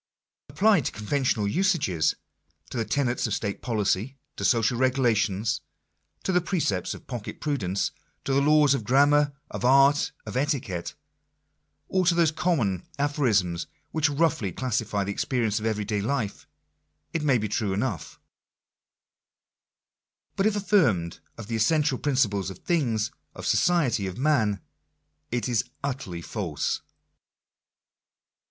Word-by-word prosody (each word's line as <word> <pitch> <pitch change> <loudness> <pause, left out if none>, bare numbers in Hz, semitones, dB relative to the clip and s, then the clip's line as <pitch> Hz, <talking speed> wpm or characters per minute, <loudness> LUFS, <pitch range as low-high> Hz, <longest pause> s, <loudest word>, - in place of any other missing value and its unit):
Applied 200 - +3
to - - -1
conventional 110 -1 0
usages 140 - +1 0.3
— 75 +1 -32
to - - -4
the 115 - 0
tenets 125 -2 0
of - - -1
state 100 -2 -3
policy 110 +2 -1
— 145 - -54
to - - -4
social 115 0 +3
regulations 115 -5 +1 0.3
— 80 0 -41
to - - 0
the 180 -1 +3
precepts 160 - -1
of - - -13
pocket 120 -4 -6
prudence 100 -11 -1 0.2
— - - -44
to 135 - 0
the 140 - +3
laws 150 -1 +5
of 135 - -1
grammar, 145 +5 +4 0.2
of - - -5
art, 140 +3 +5
of - - -7
etiquette 125 - -2 0.5
— - - -49
or 185 -1 +1
to 175 - +4
those 170 -3 +4
common 135 - 0 0.2
aphorisms 115 - +1 0.2
which 155 -1 +2
roughly 145 - +1
classify 110 -2 -1
the 100 - -3
experiences 115 -1 0
of 110 - -2
every 105 -2 -1
day 105 0 -1
life, 115 -2 -2 0.7
it 165 - 0
may 140 -4 +3
be 110 -1 -2
true 105 0 -1
enough; 105 - -3 2.2
but 195 - +2
if 215 - +1
affirmed 145 - +2 0.2
of 115 - -7
the 115 +2 -3
essential 145 +3 +2
principles 110 -9 +1
of 95 - -8
things, 115 - 0 0.2
of - - -8
society, 145 - +2
of 95 - -6
man, 115 - +1 0.7
it 120 +1 -1
is 115 -4 +1 0.2
utterly 125 -12 -4
false. 90 -9 -2
120 Hz, 145 wpm, -26 LUFS, 100-145 Hz, 2.2 s, laws